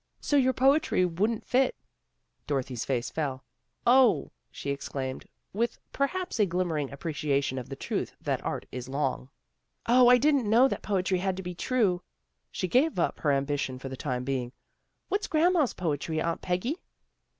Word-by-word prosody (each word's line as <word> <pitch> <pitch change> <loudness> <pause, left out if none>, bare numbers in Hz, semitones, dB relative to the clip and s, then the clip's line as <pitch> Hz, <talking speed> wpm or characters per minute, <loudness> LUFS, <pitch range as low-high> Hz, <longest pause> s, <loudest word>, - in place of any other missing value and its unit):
" - - -48
So - - +5
your 260 -2 +4
poetry 270 -7 +3
wouldn't 205 +6 -1
fit." 255 +1 +2 0.7
Dorothy's 130 -4 -2
face 125 -2 -1
fell. 135 -4 -3 0.4
"Oh!" 250 -2 +5 0.2
she 140 - -4
exclaimed, 135 -1 -4 0.3
with 230 +3 -1 0.2
perhaps 360 +2 -1
a 210 - +4
glimmering 165 -5 -1
appreciation 140 -3 -1
of 125 - -9
the 135 - -5
truth - - -3
that - - -2
art - - -3
is 125 0 -6
long. 65 - -2 0.6
"Oh! 245 +1 +6
I 250 0 +8
didn't 275 -4 +2
know 240 +5 +6
that - - -3
poetry 185 -2 0
had 190 0 -1
to 190 - -5
be 180 0 -5
true." 190 -2 +1 0.5
She 185 - -2
gave 265 - +2
up 170 - 0
her 150 - +2
ambition 140 -1 -1
for 135 +1 -7
the 130 - -5
time 125 -2 -3
being. 125 -2 -2 0.3
" - - -50
What's 415 +2 0
grand 330 +3 +3
ma's 305 -8 +2
poetry, 160 -1 -2
Aunt 165 +1 -1
Peggy? 185 - -1
180 Hz, 170 wpm, -28 LUFS, -, 0.7 s, I